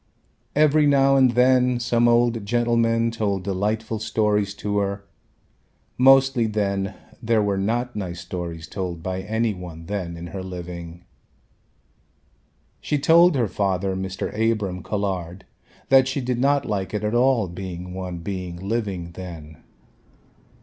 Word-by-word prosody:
Every 150 0 +4
now 135 -1 +4
and 130 -3 +4
then 125 0 +4
some 120 0 +2
old 120 -1 +3
gentlemen 115 +1 +1
told 100 -5 -1
delightful 105 +3 -2
stories 105 -2 0
to 105 0 -1
her. 100 0 -2 0.9
Mostly 135 -2 +5
then 100 -2 -1 0.3
there 110 -1 +2
were 100 -1 0
not 120 +4 -1
nice 90 -4 -4
stories 85 -2 -6
told 90 -3 -5
by 95 0 -3
any 110 +3 -1
one 85 -3 -9
then 90 -4 -4
in 85 - -7
her 95 - -4
living. 85 -2 -8 1.8
She 150 - -1
told 170 +3 +5
her 120 -4 +1
father 95 -1 -1
Mr. 95 0 -4
Abram 105 -4 -1
Colhard 95 -3 -3 0.5
that 135 -1 +6
she 130 +2 -2
did 125 -2 -2
not 140 +1 +2
like 95 -1 -3
it 105 - -2
at 105 +1 -1
all 120 -3 +3
being 90 0 -7
one 90 -2 -5
being 90 0 -5
living 95 -2 -3
then. 85 -4 -9
105 Hz, 135 wpm, -23 LUFS, 95-120 Hz, 1.8 s, that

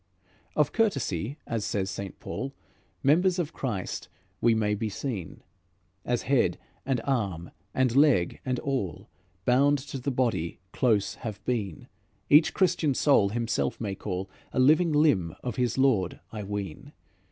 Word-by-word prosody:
"Of 150 - +3
courtesy, 140 - 0
as 115 -2 -2
says 95 -2 -1
St. 95 0 -6
Paul, 135 +1 -5 0.5
Members 175 +6 +4
of 170 -2 -2
Christ 105 -9 -4 0.3
we 115 -1 +4
may 105 -1 +1
be 110 +1 -2
seen. 100 - -5 0.6
As - - -1
head - - +2 0.3
and 135 -3 +1
arm 100 -11 -1 0.2
and 130 -2 +2
leg, 140 - +4
and 130 -1 -1
all, 125 - -3 0.4
Bound 140 +3 +4
to 135 0 -6
the 135 +3 -2
body 120 -10 -1
close 110 -6 +1
have 110 -4 -6
been, 105 -9 -2 0.4
Each 150 +2 +7
Christian 160 -7 +2
soul 130 -10 +4
himself 110 - -1
may 105 -4 -2
call 95 -1 -4 0.2
A - - -1
living 155 +6 +5
limb 145 - +3
of 125 -4 -4
his 125 -1 0
Lord, 115 -10 +2
I 110 - -5
ween. 100 -5 -5
120 Hz, 145 wpm, -28 LUFS, 100-140 Hz, 0.6 s, Each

